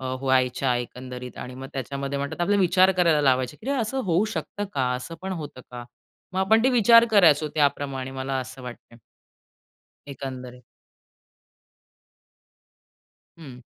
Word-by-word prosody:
अ, 130 - -8 0.2
व्हायच्या 130 -1 +1
एकंदरीत 125 +1 -7
आणि 125 0 -7
मग 135 +1 -8
त्याच्यामध्ये 140 +1 -4
म्हणतात 140 0 -4
ना, 175 - +1
आपला 205 +2 +2
विचार 185 +1 +4
करायला 170 -4 +3
लावायचे, 130 0 +1
की 270 - -3
असं 265 0 -1
होऊ 180 +3 +2
शकतं 205 - -4
का? 130 -2 0
असं 125 +6 -6
पण 190 - -4
होतं 150 -7 -7
का? 120 -1 -8 0.5
मग 190 - -3
आपण 220 +4 +3
ते - - +5
विचार 235 -1 +6
करायचो 160 -7 +5
त्याप्रमाणे 140 -3 0
मला 135 0 -4
असं 125 +1 -9
वाटतंय. 120 -1 -11 1.1
एकंदरीत. 125 -2 -8 2.8
हं. 130 -6 -11
140 Hz, 140 wpm, -24 LUFS, 130-185 Hz, 2.8 s, विचार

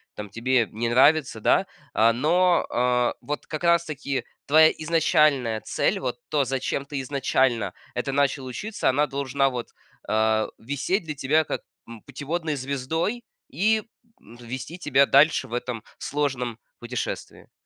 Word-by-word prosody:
там, 105 -1 -7
тебе 115 +2 +1
не 115 +2 -2
нравится, 135 -1 +4
да? - - +3 0.3
А, 115 +1 +5
но, 175 +7 +3
а, 125 0 +1
вот 150 0 -5
как 155 +2 -5
раз-таки 155 -5 0 0.2
твоя 155 +2 +7
изначальная 150 -7 +2
цель, - - 0
вот 125 -2 -3
то, 145 -2 +2
зачем 135 +1 -2
ты 140 -1 -5
изначально 130 -3 0 0.2
это 135 - -2
начал 140 -1 +1
учиться, 205 - -2
она 145 +3 +2
должна 135 0 0
вот, 125 -2 -5 0.4
а, 110 0 +2
висеть 145 - -2
для 150 -1 -5
тебя 150 +4 +2
как, - - -3 0.3
м, 115 -2 -10
путеводной 155 +1 -3
звездой, 140 - -2 0.3
и, 215 +7 +1 0.4
м, 115 +3 -16
вести 130 +8 -7
тебя 140 -5 +3
дальше 140 -1 +4
в 120 - -11
этом 120 -2 -3 0.2
сложном 130 -5 -2 0.2
путешествии. 120 +1 -5
135 Hz, 145 wpm, -25 LUFS, 125-155 Hz, 0.4 s, твоя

